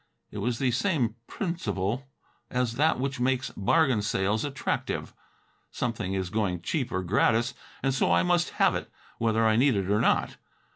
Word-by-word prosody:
It 105 - -6
was 115 +3 -1
the 130 -1 +1
same 130 - +1
principle 125 - -2 0.4
as 125 -2 0
that 150 +2 +2
which 135 0 -2
makes 130 +1 0
bargain 125 +2 +3
sales 105 +1 0
attractive. 140 -2 -3 0.6
Something 105 -6 -2
is 95 -2 -2
going 95 -5 -1
cheap 130 - -1
or 95 0 -1
gratis, 115 +5 +2 0.3
and 135 0 +2
so 135 - +2
I - - +4
must 175 -1 +2
have - - +4
it, - - -4 0.3
whether 115 0 +2
I 110 0 +4
need 130 0 +4
it 100 0 -1
or 105 - +3
not. - - +1
120 Hz, 165 wpm, -27 LUFS, 105-135 Hz, 0.6 s, I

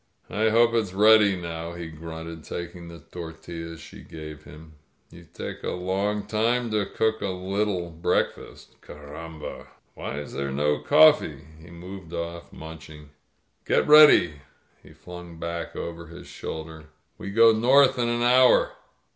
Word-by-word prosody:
"I 110 +2 +1
hope 115 +1 +4
it's 110 -5 0
ready 105 -1 +6
now," 85 -1 -6
he 85 0 -7
grunted, 80 0 -9
taking 85 0 -7
the 85 0 -10
tor 85 -2 -7
tiUas 85 0 -8
she 80 - -12
gave 75 -1 -10
him. 75 +2 -14 0.4
^^You 85 -1 -15
take - - -7
a - - -2
long 100 +3 -2
time 115 +3 0
to 105 -2 0
cook 110 0 -1
a 100 - -2
little 95 -1 -2
breakfast. 80 +1 -3
Carramha! 75 +2 -9 0.3
Why 70 - -6
is 75 -1 -7
there 70 0 -3
no 75 +2 0
coflTee?" 150 - +4 0.2
He 85 - -14
moved 85 0 -10
oflT, 85 0 -6
munching. 80 -1 -11 0.5
"Get - - +1
ready,'* 150 - +7 0.4
he - - -17
flung 90 -1 -11
back 85 0 -5
over 85 0 -6
his 85 +2 -12
shoulder. 80 -1 -8 0.3
"We 100 - -6
go 115 +3 +6
north 130 +4 +4
in 120 -1 +1
an 120 0 0
hour." 125 +1 +5
85 Hz, 150 wpm, -25 LUFS, 80-105 Hz, 0.5 s, ready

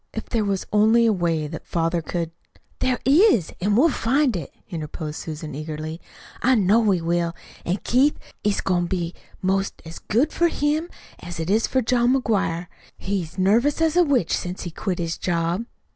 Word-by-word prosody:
If 220 - -6
there 225 -3 +1
was 200 -2 -1
only 220 +3 +5
a 225 - +4
way 165 -4 0
that 155 +1 -7
father 170 0 0
could 165 0 -3 0.2
" - - -32
"There 255 -1 +1
is, 285 - +4
an' 205 +2 +2
we'll 295 +9 +5
find 260 +1 +1
it," 165 -6 -5 0.2
interposed 155 -2 -5
Susan 155 -1 -6
eagerly. 155 +2 -5 0.4
"I 260 +1 +4
know 210 +1 +4
we 200 -6 +2
will. 170 0 0 0.3
An' 180 +3 0
Keith, 270 +5 +3 0.3
it's 205 -1 +1
goin' 175 -2 +1
to - - -7
be 175 -2 -2 0.3
'most 195 +1 0
as 165 +1 -8
good 260 +9 +1
for 340 - +3
him 310 +1 0 0.3
as 175 -1 -7
it 165 +3 -1
is 220 +2 +3
for 260 -1 +1
John 240 +2 +3
McGuire. 190 -8 0 0.3
He's 185 -3 -3
nervous 225 - +3
as 325 0 +2
a 355 - +6
witch 270 - +2
since 180 +1 -4
he 175 - -5
quit 185 +2 -3
his 165 -1 -3
job." 175 +5 -1
190 Hz, 190 wpm, -23 LUFS, 170-240 Hz, 0.4 s, a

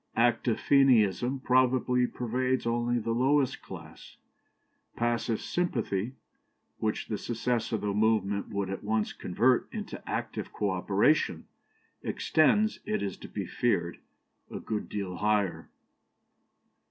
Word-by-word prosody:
Active 115 -1 +2
Fenianism 130 -2 +3
probably 125 -1 +3
pervades 125 +2 -1
only 120 +1 +1
the 115 0 -2
lowest 130 +3 +2
class; - - -11 0.8
passive 120 -1 0
sympathy, 120 - -1 0.7
which 110 -1 -1
the 105 - -3
success 120 0 -1
of 110 - -1
the 105 -1 -1
movement 105 -2 +1
would 100 -1 -2
at 95 - -5
once 110 0 0
convert 120 +8 +1
into - - -6
active - - -3
co 105 -2 -1
operation, 95 - +2 0.6
extends, 210 +7 +2
it 215 - -2
is 100 -3 -3
to - - -10
be - - -4
feared, 85 -8 0 0.5
a - - -6
good 105 -1 -4
deal 95 -4 -4
higher. 105 -1 0
115 Hz, 120 wpm, -29 LUFS, 105-125 Hz, 0.8 s, Fenianism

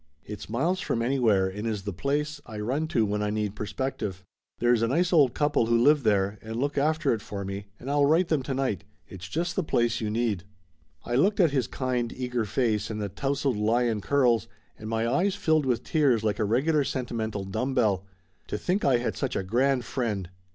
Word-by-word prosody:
It's 105 -1 -8
miles 165 +12 0
from 115 -9 -1
anywhere, 115 -7 +3
and 105 +4 -4
is 105 -3 -2
the 100 0 -4
place 145 - -2
I 110 -2 -7
run 135 +9 -1
to 115 -8 +2
when 105 0 -1
I 105 - 0
need 105 -1 -2
perspective. 105 -4 -4 0.3
There 120 +1 +3
is 115 - +2
a 115 - +2
nice 175 +8 +1
old 140 -7 +5
couple 145 -6 +2
who 115 0 +3
live 145 +5 +5
there 100 -3 +1
and 110 0 -6
look 140 +4 -1
after 155 +1 +2
it 110 - -3
for 100 -1 -6
me, 100 +1 -5
and 125 - -10
I'll 145 0 +3
write 165 +4 +3
them 155 -4 +2
to 130 0 -3
night. 130 -9 -1 0.2
It's 95 -1 -9
just 170 - -2
the 190 - 0
place 120 -6 +1
you 110 - -1
need." 110 -5 -1 0.6
I 120 - -3
looked 195 +12 +3
at 170 -6 +5
his 130 -5 0
kind 125 -3 -2
eager 125 -3 -2
face 105 -1 0
and 110 -1 -4
the 105 -1 -2
tousled 135 +1 -1
lion 110 +1 +1
curls, 120 -4 +2 0.3
and 110 - -8
my 115 0 0
eyes 180 +10 +1
filled 155 -7 +1
with 125 -3 0
tears 135 -8 +2
like 105 0 0
a 110 - +2
regular 140 +8 +2
senti 130 -3 -3
mental 110 -3 -2
dumb 125 +8 -2
bell. 100 -7 +2 0.4
To - - -3
think 185 - -1
I 135 -3 +4
had 120 - -2
such 135 - -2
a 95 - -1
grand 125 +5 +1
friend 105 -9 -2
120 Hz, 220 wpm, -27 LUFS, 105-140 Hz, 0.6 s, old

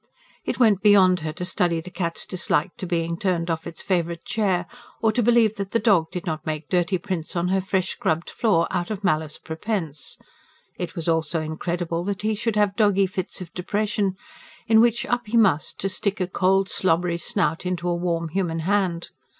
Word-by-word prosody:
It - - -2
went 215 -6 +4
beyond 190 -4 +6
her 155 -1 -3
to 180 - -5
study 175 -3 +1
the 180 +3 -9
cat's 170 -2 -3
dislike 180 -2 -1
to 190 -6 -5
being 170 -1 -1
turned 175 -4 0
off 160 0 -3
its 165 - -9
favourite 170 -2 -1
chair, 190 -5 0 0.3
or 225 - +3
to 240 - +1
believe 230 -2 +4
that 200 0 -5
the 230 - +3
dog 200 -8 +3
did 180 - -6
not 160 -3 -3
make 155 -1 -4
dirty 180 +1 +2
prints 175 -3 -4
on 175 +1 0
her 190 0 +2
fresh 190 0 0
scrubbed 160 +2 -1
floor 195 -8 +2
out 175 -2 -1
of 210 -2 -4
malice 155 -3 0
prepense; 160 -3 -4 0.6
it 175 0 -5
was 170 -2 -4
also 160 0 +1
incredible 170 +2 -2
that 200 +1 -3
he 215 0 +1
should 220 +1 -1
have 205 -2 +2
doggy 200 -2 +4
fits 185 0 -4
of 175 -2 -9
depression, 200 +1 -1 0.5
in 220 -1 +6
which 235 0 +2
up 245 -2 -1
he 230 +3 +1
must 190 -9 +3
to 195 - +1
stick 195 +2 -2
a 185 - +1
cold, 190 +1 +2
slobbery 175 -2 +1
snout 170 -1 0
into 180 -1 -2
a 175 - +2
warm 170 -1 -1
human 165 -2 -1
hand. 185 -2 0
180 Hz, 200 wpm, -24 LUFS, 170-205 Hz, 0.6 s, beyond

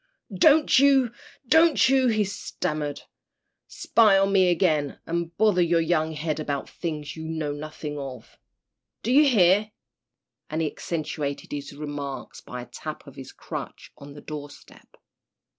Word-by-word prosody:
"Don't 295 - +5
you 270 -4 +4 0.4
don't 320 +4 +5
you," 265 -1 +3
he 215 -3 +2
stammered, 150 -6 -4 0.6
"spy 215 -4 +3
on 195 0 +2
me 190 -2 +5
again, 160 -5 +1
and 170 0 -3
bother 210 -5 +3
your 170 -1 +3
young 160 -1 0
head 155 0 -3
about 145 -2 -3
things 155 -4 -5
you 160 0 -7
know 160 -2 -3
nothing 150 0 -6
of. 135 -2 -9 0.6
Do 235 - -1
you 290 +3 +6
hear?" 205 -2 +4 0.8
and 155 - -3
he - - +1
accentuated 150 -3 -4
his 145 -1 -5
remarks 145 -2 -6
by 125 0 -7
a - - -11
tap 155 +3 -8
of 140 - -13
his 130 -1 -10
crutch - - -8
on 140 0 -12
the 145 - -11
door 150 -1 -7
step. - - -18
160 Hz, 150 wpm, -25 LUFS, 145-200 Hz, 0.8 s, you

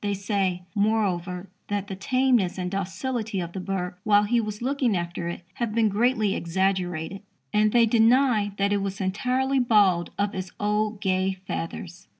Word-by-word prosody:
They 205 -1 0
say, 195 -2 -1
moreover, 200 -4 0 0.2
that 205 -1 -2
the 195 - -5
tameness 245 -3 +1
and 180 -1 -3
docility 205 +3 -3
of 170 -1 -5
the 190 - -4
bird, 180 -1 -3
while 205 -1 +4
he 235 +3 +2
was 210 -1 -5
looking 255 -6 +1
after 175 0 -4
it, 170 +1 -5
have 230 -1 -3
been 225 -2 +3
greatly 215 -1 +2
exaggerated, 185 0 -1 0.3
and 210 0 +3
they 235 0 +5
deny 225 -1 +3
that 200 +1 +1
it - - +2
was 195 -1 -4
entirely 255 +8 0
bald 205 -8 +3
of 205 0 0
its 185 -1 -5
old 210 0 0
gay 190 0 +1
feathers. 175 +1 -6
200 Hz, 165 wpm, -25 LUFS, 185-220 Hz, 0.3 s, they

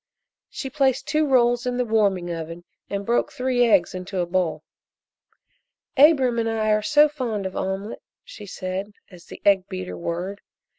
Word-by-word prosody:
She 270 -3 -6
placed 265 -2 +1
two 305 0 +1
rolls 245 -2 +3
in 245 0 -1
the 250 - 0
warming 200 -6 +1
oven 165 +1 -7 0.3
and 200 0 -3
broke 235 +3 +1
three 255 -2 +1
eggs 195 -6 +3
into 185 +1 -6
a 175 - +1
bowl. 175 -1 -1 1.3
"Abram 270 -5 +5
and 225 0 0
I 220 -1 0
are 215 0 +3
so 295 +6 +5
fond 245 -9 -4
of 190 - -5
omelette," 195 +3 -4 0.2
she 210 -2 -11
said, 185 +2 -5 0.2
as 175 -2 -14
the - - -12
egg 195 -2 +3
beater 90 -1 -5
whirred. 175 - -4
210 Hz, 165 wpm, -23 LUFS, 185-250 Hz, 1.3 s, Abram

